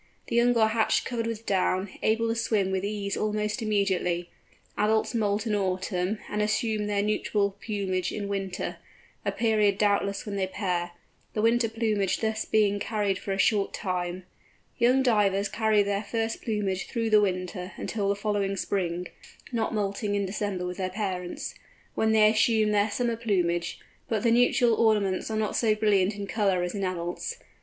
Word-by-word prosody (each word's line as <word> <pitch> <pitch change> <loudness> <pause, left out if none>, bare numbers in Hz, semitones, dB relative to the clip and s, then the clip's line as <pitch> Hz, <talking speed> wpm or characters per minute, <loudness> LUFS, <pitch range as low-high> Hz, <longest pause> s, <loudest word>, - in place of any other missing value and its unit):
The - - -1
young 240 0 +4
are 220 -1 +4
hatched 220 0 +1
covered 230 -2 -2
with 230 0 -5
down, 190 0 +1
able 225 +1 +2
to - - +2
swim 215 -4 +1
with 190 0 -1
ease 200 -1 -2
almost 210 +2 -1
immediately. 190 -5 0 0.4
Adults 215 +3 +1
moult 210 -1 0
in 220 - 0
autumn, 190 0 -1
and 210 - -2
assume 215 0 0
their 205 -1 +1
nuptial 210 -1 0
plumage 195 -4 -1
in 205 -1 -4
winter—a 195 -2 -5
period 215 -3 +2
doubtless 200 -1 +1
when 205 -2 -4
they 190 -1 0
pair—the 180 +2 -4
winter 230 0 +3
plumage 215 -4 0
thus 220 -1 -1
being 205 -2 +2
carried 205 -3 -1
for 195 - -5
a 195 - -1
short 200 0 +2
time. 180 -1 -3 0.6
Young 250 +3 +4
Divers 205 -5 +2
carry 220 -2 +2
their 200 0 -1
first 225 0 -2
plumage 200 -4 -2
through 230 -2 -2
the 210 -1 +7
winter 185 -1 -2
until 205 -3 -2
the 200 - +2
following 200 -1 -1
spring 180 -2 -2 0.4
(not 230 -3 -1
moulting 205 -1 -1
in 200 -1 0
December 195 -2 -3
with 180 0 -4
their 185 -1 -1
parents), 185 -3 -4 0.4
when 220 0 +1
they 215 -1 +6
assume 220 -1 +3
their 205 +1 +2
summer 235 +2 0
plumage, 175 -7 0 0.3
but 220 -3 0
the 230 - +3
nuptial 240 0 +4
ornaments 210 -4 +2
are 220 - -2
not 215 -1 -1
so 220 -2 +3
brilliant 205 -2 +2
in 205 -1 -5
colour 195 -3 +1
as 180 - -3
in 200 -2 -3
adults. 185 - -3
205 Hz, 170 wpm, -27 LUFS, 195-220 Hz, 0.6 s, the